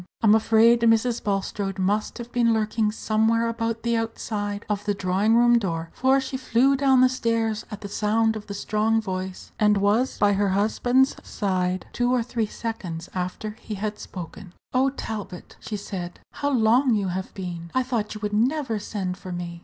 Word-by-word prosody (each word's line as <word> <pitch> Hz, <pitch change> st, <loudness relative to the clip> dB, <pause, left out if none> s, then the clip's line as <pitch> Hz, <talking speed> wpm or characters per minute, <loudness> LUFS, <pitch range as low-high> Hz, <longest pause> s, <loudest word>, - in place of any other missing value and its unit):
I'm 215 Hz, -1 st, +6 dB
afraid 225 Hz, +1 st, +5 dB
Mrs. 230 Hz, +1 st, +2 dB
Bulstrode 195 Hz, -1 st, -2 dB
must 205 Hz, +3 st, 0 dB
have 240 Hz, 0 st, -8 dB
been 235 Hz, -2 st, +3 dB
lurking 215 Hz, 0 st, 0 dB
somewhere 225 Hz, +1 st, +1 dB
about 230 Hz, 0 st, -2 dB
the 235 Hz, 0 st, +1 dB
outside 210 Hz, -2 st, -3 dB
of 205 Hz, -1 st, -2 dB
the 205 Hz, -1 st, 0 dB
drawing 195 Hz, +4 st, +2 dB
room 240 Hz, 0 st, +5 dB
door, 165 Hz, -5 st, -3 dB
for 265 Hz, +1 st, +3 dB
she 265 Hz, 0 st, -4 dB
flew 260 Hz, +1 st, +3 dB
down 265 Hz, -2 st, +4 dB
the 255 Hz, -, +7 dB
stairs 230 Hz, -3 st, -1 dB
at 210 Hz, -1 st, -8 dB
the 200 Hz, -, -5 dB
sound 220 Hz, +2 st, +1 dB
of 215 Hz, -1 st, -7 dB
the 200 Hz, -, -5 dB
strong 215 Hz, +2 st, +1 dB
voice, 185 Hz, -3 st, -5 dB
and 210 Hz, -1 st, +4 dB
was 210 Hz, +6 st, +1 dB
by 205 Hz, -1 st, +3 dB
her 200 Hz, 0 st, +1 dB
husband's 245 Hz, +7 st, +2 dB
side 185 Hz, -2 st, -1 dB
two 245 Hz, 0 st, +1 dB
or 250 Hz, -2 st, +2 dB
three 230 Hz, -2 st, -2 dB
seconds 190 Hz, -8 st, -5 dB
after 185 Hz, +4 st, -3 dB
he 215 Hz, -, -5 dB
had 210 Hz, +1 st, -4 dB
spoken. 180 Hz, +1 st, -9 dB, 0.2 s
"Oh, 260 Hz, +2 st, +3 dB
Talbot," 210 Hz, -8 st, -7 dB
she 210 Hz, -, -5 dB
said, 180 Hz, -3 st, -6 dB
"how 285 Hz, -, -2 dB
long 245 Hz, 0 st, +3 dB
you 200 Hz, -3 st, 0 dB
have 185 Hz, +1 st, -4 dB
been! 175 Hz, -3 st, -6 dB
I 260 Hz, -, +3 dB
thought 230 Hz, -5 st, -2 dB
you 215 Hz, -, -8 dB
would 210 Hz, -1 st, -3 dB
never 245 Hz, +1 st, +1 dB
send 190 Hz, -3 st, -4 dB
for 185 Hz, -, -8 dB
me. 175 Hz, -1 st, -5 dB
215 Hz, 185 wpm, -24 LUFS, 195-230 Hz, 0.2 s, the